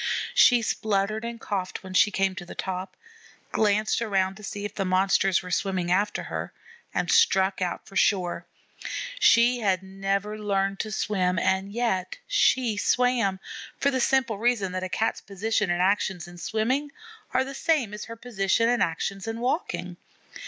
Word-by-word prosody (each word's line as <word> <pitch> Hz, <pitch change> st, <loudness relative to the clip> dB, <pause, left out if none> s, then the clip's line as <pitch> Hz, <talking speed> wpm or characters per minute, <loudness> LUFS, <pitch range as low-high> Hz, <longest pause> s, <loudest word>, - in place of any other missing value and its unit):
She 245 Hz, -, +6 dB
spluttered 215 Hz, 0 st, -1 dB
and 235 Hz, 0 st, -5 dB
coughed 190 Hz, -4 st, -4 dB
when 190 Hz, 0 st, -8 dB
she 195 Hz, -, +5 dB
came 195 Hz, -1 st, 0 dB
to 185 Hz, -1 st, -7 dB
the 175 Hz, -, -10 dB
top, 185 Hz, 0 st, -5 dB, 0.5 s
glanced 215 Hz, +1 st, +1 dB
around 195 Hz, -4 st, +1 dB
to 215 Hz, -, -13 dB
see 205 Hz, 0 st, -5 dB
if 205 Hz, -, -5 dB
the 195 Hz, -, -2 dB
Monsters 190 Hz, 0 st, +2 dB
were 180 Hz, -, -8 dB
swimming 185 Hz, -2 st, -1 dB
after 205 Hz, +3 st, +1 dB
her, -, -, -5 dB, 0.4 s
and -, -, -1 dB
struck 195 Hz, -, +3 dB
out 180 Hz, -1 st, -2 dB
for 195 Hz, -, -14 dB
shore. 180 Hz, -4 st, +1 dB, 0.7 s
She 240 Hz, -, +5 dB
had 190 Hz, -4 st, +1 dB
never 195 Hz, +2 st, -2 dB
learned 195 Hz, -1 st, 0 dB
to 215 Hz, -, -3 dB
swim, 185 Hz, -3 st, 0 dB
and 190 Hz, +3 st, 0 dB
yet 220 Hz, -, -1 dB
she 255 Hz, -, +2 dB
swam, 235 Hz, -4 st, +2 dB, 0.4 s
for 280 Hz, -, +2 dB
the 260 Hz, -1 st, 0 dB
simple 250 Hz, -5 st, +1 dB
reason 225 Hz, -5 st, +1 dB
that 185 Hz, 0 st, -3 dB
a 185 Hz, -, -4 dB
Cat's 215 Hz, +4 st, -1 dB
position 210 Hz, 0 st, -1 dB
and 175 Hz, +1 st, +1 dB
actions 190 Hz, -3 st, 0 dB
in 175 Hz, 0 st, -12 dB
swimming 255 Hz, +10 st, -1 dB, 0.4 s
are 255 Hz, +1 st, +2 dB
the 270 Hz, +1 st, -7 dB
same 275 Hz, -7 st, 0 dB
as 210 Hz, -, -6 dB
her 230 Hz, -, -8 dB
position 230 Hz, -2 st, 0 dB
and 245 Hz, 0 st, +1 dB
actions 195 Hz, +5 st, -2 dB
in 225 Hz, 0 st, -3 dB
walking. 235 Hz, -, -2 dB
200 Hz, 170 wpm, -26 LUFS, 190-230 Hz, 0.7 s, She